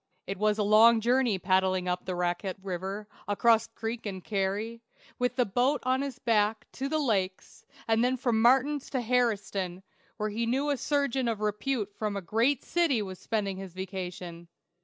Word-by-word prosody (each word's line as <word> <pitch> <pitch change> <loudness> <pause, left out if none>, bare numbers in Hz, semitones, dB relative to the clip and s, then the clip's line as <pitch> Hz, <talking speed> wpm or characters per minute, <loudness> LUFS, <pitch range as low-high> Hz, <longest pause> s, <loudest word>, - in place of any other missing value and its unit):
It 195 0 -5
was 210 0 +2
a 210 - +1
long 220 +3 +6
journey 240 -2 +2
paddling 185 0 +1
up 180 0 -2
the 185 -1 -3
Racquette 175 +2 -2
River, 195 +2 -4 0.2
across 225 +2 +3
creek 225 0 -5
and 190 -3 -5
carry, 210 +3 -2 0.4
with 250 0 0
the 250 - +2
boat 250 +8 +1
on 260 +1 +2
his 275 -3 -4
back, 215 -2 +1
to 270 +1 -4
the 310 - +1
lakes, 195 -10 -2 0.2
and 225 +1 +3
then 255 +1 +2
from 235 -3 +1
Martin's 270 +4 +3
to 265 - -1
"Harri'tstown," 205 -6 0 0.3
where 215 0 -1
he 230 +2 -2
knew 275 +5 +1
a 285 - 0
surgeon 275 -3 0
of 225 -3 -1
repute 210 +1 -1
from 210 -1 -3
a - - -3
great 235 +9 +1
city 320 -11 +1
was 185 -2 -8
spending 200 -4 -2
his 190 -2 -8
vacation. 180 -2 -6
215 Hz, 180 wpm, -29 LUFS, 190-250 Hz, 0.4 s, long